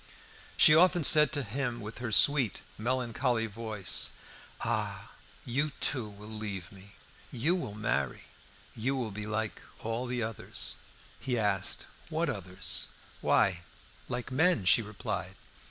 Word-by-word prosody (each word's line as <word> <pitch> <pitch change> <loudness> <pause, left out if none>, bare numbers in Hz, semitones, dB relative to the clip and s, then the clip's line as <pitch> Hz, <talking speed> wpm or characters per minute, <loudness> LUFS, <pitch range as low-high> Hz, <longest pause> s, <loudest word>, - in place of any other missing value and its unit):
She 150 - +8
often 175 +1 +5
said 150 +1 +6
to 145 - -1
him, 125 +1 -3
with 110 +1 -8
her 120 -2 -4
sweet, 130 -1 +5
melancholy 120 0 -1
voice 110 -2 0 0.5
"Ah! - - -2 0.3
you 140 +4 -1
too, 130 -5 0
you - - -9
will 105 +1 -12
leave 105 -5 -6
me! 100 +1 -15 0.4
You 145 +8 0
will 170 - -4
marry! 70 - -2 0.5
You 130 +5 -1
will 120 -5 -3
be 105 +1 -6
like 110 0 -3 0.2
all 115 +3 -3
the 120 -1 -2
others." 110 -1 0 0.4
He 125 -2 -2
asked, 100 -4 0 0.2
"What 165 +1 0
others?" 95 -3 +2 0.3
"Why, 90 -3 +2 0.5
like 125 0 -4
all 130 - -4
men," 160 - +3
she 105 - +6
replied. 105 -2 -5
115 Hz, 140 wpm, -30 LUFS, 105-130 Hz, 0.5 s, She